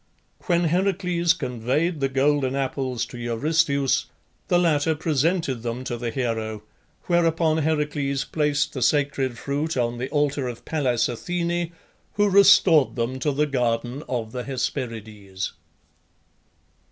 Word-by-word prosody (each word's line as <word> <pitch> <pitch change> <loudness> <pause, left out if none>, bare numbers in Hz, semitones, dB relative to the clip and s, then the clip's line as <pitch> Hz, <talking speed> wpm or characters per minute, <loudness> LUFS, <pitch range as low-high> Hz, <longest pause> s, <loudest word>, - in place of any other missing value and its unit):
When 175 -2 +3
Heracles 175 0 +1
conveyed 140 +5 -1
the 135 -1 0
golden 135 0 +1
apples 130 -3 -2
to 120 - -10
Eurystheus 140 +4 +1 0.4
the 175 - +3
latter 160 -2 +2
presented 155 -3 0
them 120 +2 -4
to 130 -2 -3
the 120 0 -3
hero, 110 -3 -3 0.4
whereupon 165 -2 +2
Heracles 145 -3 0
placed 150 -1 0
the 130 - -4
sacred 135 -2 +1
fruit 145 +4 -2
on 120 -1 -1
the 130 - -3
altar 145 -2 0
of 120 -1 -7
Pallas 130 -7 +1
Athene, 170 +6 -2 0.4
who 205 0 +2
restored 185 -6 +6
them 125 +2 -2
to 145 +3 0
the 145 +2 +1
garden 125 -1 -1
of 115 -4 -3
the 125 0 -4
Hesperides. 110 -7 -4
140 Hz, 130 wpm, -24 LUFS, 125-160 Hz, 0.4 s, restored